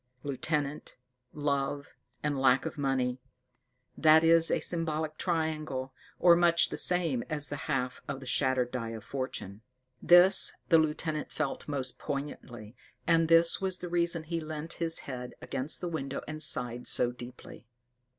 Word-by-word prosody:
Lieutenant, 145 +1 -3 0.4
love, 145 -1 -2 0.3
and 150 -1 0
lack 130 0 +4
of - - -4
money 130 -3 -1 0.8
that 160 0 +6
is 165 0 +5
a - - +1
symbolic 155 -2 -1
triangle, 155 -6 -2 0.2
or 175 -1 +6
much 170 -1 +4
the - - -5
same 165 -9 +1
as 150 -2 -2
the 145 - -3
half 130 -3 -1
of 140 -1 -4
the 135 - -10
shattered 130 -1 +1
die 115 -3 -3
of 110 -2 -8
Fortune. 110 -5 -5 0.4
This 175 +3 +6 0.2
the 165 -2 +6
lieutenant 155 0 -2
felt 155 -3 -3
most 135 -4 -3
poignantly, 125 -6 -6 0.3
and 165 -1 +3
this 165 +2 +4
was 190 -1 -1
the 180 - -7
reason 170 -1 +1
he 165 +1 -3
leant 155 +1 -5
his 165 -1 0
head 125 -2 -7
against 135 +2 -3
the 180 - -2
window, 140 -5 -4
and 155 +1 -5
sighed 125 -5 -1
so 120 - +2
deeply. 125 -1 -11
150 Hz, 150 wpm, -30 LUFS, 130-165 Hz, 0.8 s, that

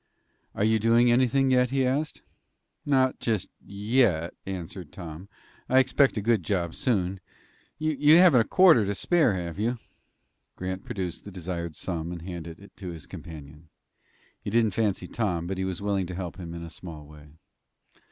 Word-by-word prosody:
"Are - - 0
you 110 +1 +3
doing 115 +2 +4
anything?" 130 +2 +3
he 130 +1 +2
asked. 145 +4 -2 0.6
"Not 130 -2 +2
just 110 -6 -1
yet," 100 -5 +1
answered 90 -3 -6
Tom, 85 +1 -9 0.4
"I 130 - +4
expect 130 0 +4
a 105 - -2
good 115 -4 +3
job 85 -1 -1
soon. 95 -6 0 0.6
You 155 0 +4
haven't 175 -9 +7
a - - -1
quarter 175 - +6
to 100 0 -2
spare, 155 - +2
have 85 0 -5
you?" 120 +3 0 0.8
Grant 95 +1 -5
produced 95 -7 -4
the 100 - -9
desired 85 -3 -5
sum 85 -1 -4
and 85 -2 -7
handed 85 -2 -7
it 100 - -16
to 95 -3 -6
his 85 -3 -8
companion. 75 0 -11 0.7
He - - -3
didn't 110 0 +2
fancy 100 -4 0
Tom, 90 -7 -2
but 95 +1 -4
he 95 - -1
was 95 +1 -4
willing 100 -3 0
to 90 - -6
help 90 -1 -5
him 85 -2 -7
in 85 - -7
a 85 - -8
small 80 -3 -9
way. 75 0 -14
100 Hz, 170 wpm, -27 LUFS, 85-120 Hz, 0.8 s, haven't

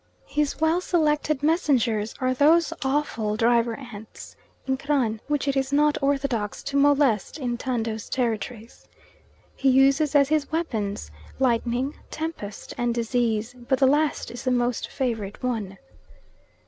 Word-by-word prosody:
His 295 -1 -1
well 320 +3 +2
selected 305 -4 +1
messengers 255 - +1
are 255 0 +1
those 325 +5 +4
awful 265 -6 -1
driver 235 0 +2
ants 225 -5 -11 0.3
(Inkran) 265 -4 0
which 295 -1 -1
it 275 - +1
is 270 0 0
not 295 +1 +2
orthodox 270 -7 -1
to 280 - -5
molest 280 - +3
in 245 -5 -2
Tando's 230 -3 -3
territories. 230 -1 -3 0.7
He 270 - +2
uses 275 +3 +4
as 280 -1 +5
his 310 -1 0
weapons 215 - -2 0.3
lightning, 250 +2 0 0.2
tempest, 310 -11 -6
and 240 -1 0
disease, 235 -1 0
but 250 +1 -1
the 265 - +4
last 295 +3 +1
is 240 0 -8
the 255 - 0
most 245 -1 0
favourite 225 -5 -3
one. 215 -6 -2
260 Hz, 135 wpm, -25 LUFS, 230-290 Hz, 0.7 s, as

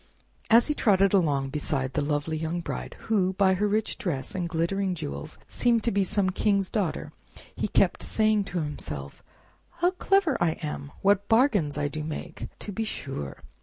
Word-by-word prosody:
As 230 +1 +7
he 300 - 0
trotted 195 -7 +3
along 145 -8 +2
beside 135 -3 -2
the 150 - +1
lovely 145 +2 -1
young 160 +2 -2
Bride, 60 - -5
who, 190 -4 +1
by 190 0 +4
her 205 +3 +1
rich 215 +1 0
dress 150 -9 -3
and 180 -3 -2
glittering 180 +3 0
jewels, 70 - -6
seemed 235 -2 +2
to 235 - +1
be 200 0 +2
some 190 0 +1
king's 200 -1 +1
daughter, 195 -8 -1 0.4
he - - -1
kept - - +2
saying 215 -2 +2
to 175 -3 -2
himself, 75 - -6 0.5
"How 355 +1 +2
clever 380 -3 +2
I 170 -2 +3
am! 145 -1 -5
What 200 0 +3
bargains 220 - +3
I 145 0 0
do 155 +1 -4
make, 155 0 -6
to 205 - -5
be 220 +3 -2
sure!" 135 - -5
185 Hz, 175 wpm, -27 LUFS, 150-210 Hz, 0.5 s, As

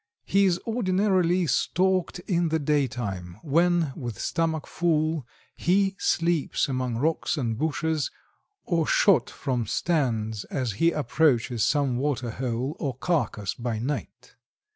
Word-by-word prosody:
He 200 0 +3
is 180 -2 +2
ordinarily 185 -5 +2
stalked 185 +5 +1
in 175 -3 +1
the 160 - +1
daytime, 120 - -2
when, 170 0 +2
with 120 -6 -5
stomach 160 -2 -1
full, 160 -4 0 0.3
he 195 +2 +2
sleeps 170 -3 +1
among 130 -3 -2
rocks 160 +4 0
and 115 -5 -1
bushes, 155 +2 -1 0.6
or 165 -4 +1
shot 200 -5 +4
from 125 -5 -2
stands 110 - 0
as 130 -5 -2
he 165 +12 +2
approaches 130 -6 +1
some 140 -4 +1
water 130 -3 -1
hole 125 +3 -3
or 135 -5 -2
carcass 135 - -1
by 120 -2 -3
night. 125 0 -5
150 Hz, 125 wpm, -26 LUFS, 125-170 Hz, 0.6 s, shot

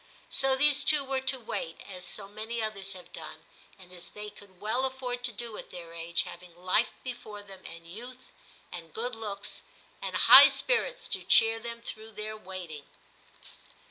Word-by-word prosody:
So 270 -1 +5
these 290 +1 +4
twp 295 -3 +4
were 265 -1 0
to 265 0 0
wait, 165 -7 -5
as 185 -2 -5
so 200 -2 -1
many 220 +3 -5
others 205 -3 -2
have 180 -1 -13
done, - - -9 0.3
and 185 -2 -15
as 175 -1 -8
they 210 0 -8
could 190 -3 -17
well 220 +5 0
afford 255 -2 -3
to 245 - +3
do 230 0 -6
at - - -10
their 170 -2 -9
age, 170 0 0
having 175 -1 -11
life 185 +6 +2
be 255 - -3
fore 215 -4 -10
them, 195 -2 -12
and 170 0 -10
youth, 245 +9 -10 0.4
and 165 -3 -9
good 245 +2 -2
looks, 210 -3 -3 0.4
and - - -4
high - - +11
spirits - - 0
to - - -2
cheer 225 0 +5
them 235 0 -7
through 220 0 -8
their 215 +1 -4
waiting. 180 -7 -8
215 Hz, 180 wpm, -29 LUFS, 185-245 Hz, 0.4 s, high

